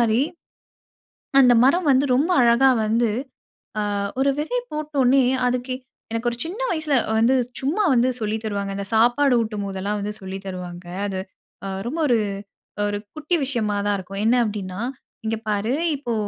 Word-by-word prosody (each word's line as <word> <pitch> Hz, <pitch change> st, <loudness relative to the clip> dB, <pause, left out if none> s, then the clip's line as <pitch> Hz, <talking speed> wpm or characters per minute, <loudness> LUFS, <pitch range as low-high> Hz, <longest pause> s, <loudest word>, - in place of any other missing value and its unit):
மாரி, 230 Hz, +2 st, +3 dB, 1.2 s
அந்த 250 Hz, -2 st, +7 dB
மரம் 330 Hz, +5 st, +3 dB
வந்து 265 Hz, +1 st, +4 dB
ரொம்ப 290 Hz, +8 st, +2 dB
அழகா 240 Hz, +3 st, +5 dB, 0.2 s
வந்து 230 Hz, +2 st, +2 dB, 0.7 s
அ -, -, +1 dB, 0.4 s
ஒரு 275 Hz, +1 st, +3 dB
விதை 320 Hz, +12 st, -1 dB
போட்ட 305 Hz, 0 st, -5 dB
ஒடனே 260 Hz, +2 st, +5 dB, 0.3 s
அதுக்கு 250 Hz, +1 st, -1 dB, 0.4 s
எனக்கு 230 Hz, +1 st, 0 dB
ஒரு 235 Hz, -, -6 dB
சின்ன 370 Hz, +8 st, -6 dB
வயசுல 310 Hz, -4 st, 0 dB, 0.2 s
வந்து 240 Hz, +4 st, +4 dB, 0.2 s
சும்மா 305 Hz, +11 st, 0 dB
வந்து 245 Hz, 0 st, +3 dB
சொல்லித் 215 Hz, +1 st, -2 dB
தருவாங்க, 200 Hz, -2 st, -2 dB
இந்த 200 Hz, -, -4 dB
சாப்பாடு 245 Hz, +5 st, +4 dB
ஊட்டும்போதுலாம் 205 Hz, -2 st, -3 dB
வந்து 205 Hz, +1 st, -3 dB
சொல்லித் 190 Hz, +1 st, -7 dB
தருவாங்க. 180 Hz, -1 st, -7 dB, 0.2 s
அது 190 Hz, -2 st, -3 dB, 0.5 s
அ -, -, -3 dB, 0.2 s
ரொம்ப 320 Hz, +6 st, -3 dB
ஒரு 240 Hz, -3 st, +4 dB, 0.7 s
ஒரு 205 Hz, 0 st, -1 dB, 0.2 s
குட்டி 310 Hz, +3 st, 0 dB
விஷயமாதான் 205 Hz, -5 st, 0 dB
இருக்கும். 195 Hz, +2 st, -6 dB
என்ன 235 Hz, +3 st, +4 dB
அப்டின்னா, 200 Hz, -3 st, -4 dB, 0.4 s
"இங்க 220 Hz, 0 st, 0 dB
பாரு 210 Hz, +4 st, 0 dB, 0.2 s
இப்போ 245 Hz, -4 st, -3 dB
235 Hz, 150 wpm, -23 LUFS, 205-270 Hz, 1.2 s, அந்த